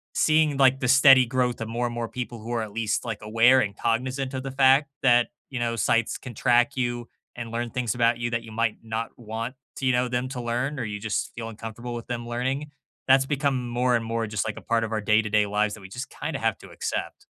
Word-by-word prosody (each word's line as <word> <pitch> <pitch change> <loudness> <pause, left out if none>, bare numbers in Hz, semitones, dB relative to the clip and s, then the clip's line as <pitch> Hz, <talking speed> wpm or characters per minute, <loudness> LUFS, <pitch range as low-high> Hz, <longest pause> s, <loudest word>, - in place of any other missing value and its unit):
seeing, 155 -2 +3
like, 135 -1 +5
the 125 - -1
steady 135 0 +7
growth 125 -1 0
of 110 - -3
more 120 +2 -1
and 120 - -3
more 115 -1 -2
people 120 -2 -5
who 115 +2 -7
are 115 -2 0
at 105 - -7
least, 110 -1 -1
like, 110 -3 -4
aware 115 +5 +5
and 100 -4 -1
cognizant 130 +3 -1
of 130 0 -3
the 135 - -4
fact 135 +1 +4
that, 120 -2 +5 0.2
you 125 -3 -4
know, 115 -1 -1
sites 115 +1 +1
can 125 -3 -9
track 120 +4 +3
you 120 -1 -2 0.3
and 115 -2 -6
learn 120 +1 -2
things 125 -4 -1
about 115 0 +3
you 120 0 -1
that 115 0 -1
you 110 - -11
might 115 -1 0
not 115 +1 -3
want, 115 +2 -5 0.3
you 130 -1 +3
know, 125 +1 +2
them 125 +1 -1
to 125 -2 -5
learn, 125 +4 -2
or - - -2
you 105 -1 -4
just 110 -1 -2
feel 115 -1 -5
uncomfortable 115 +2 -7
with 115 - -7
them 120 -1 -4
learning, 130 +5 -2 0.4
that's 135 0 +5
become 135 -3 -1
more 125 +1 +2
and 115 -1 -1
more 115 -1 -2
just, 105 -1 -2
like, 110 - -3
a - - -7
part 115 -1 0
of 110 - -4
our 110 -1 -1
day-to-day 105 0 +3
lives 105 +1 0
that 110 - -9
we 95 - -11
just 125 +6 -6
kind - - -5
of - - -4
have - - +2
to - - -13
accept. - - -4
120 Hz, 250 wpm, -25 LUFS, 115-130 Hz, 0.4 s, steady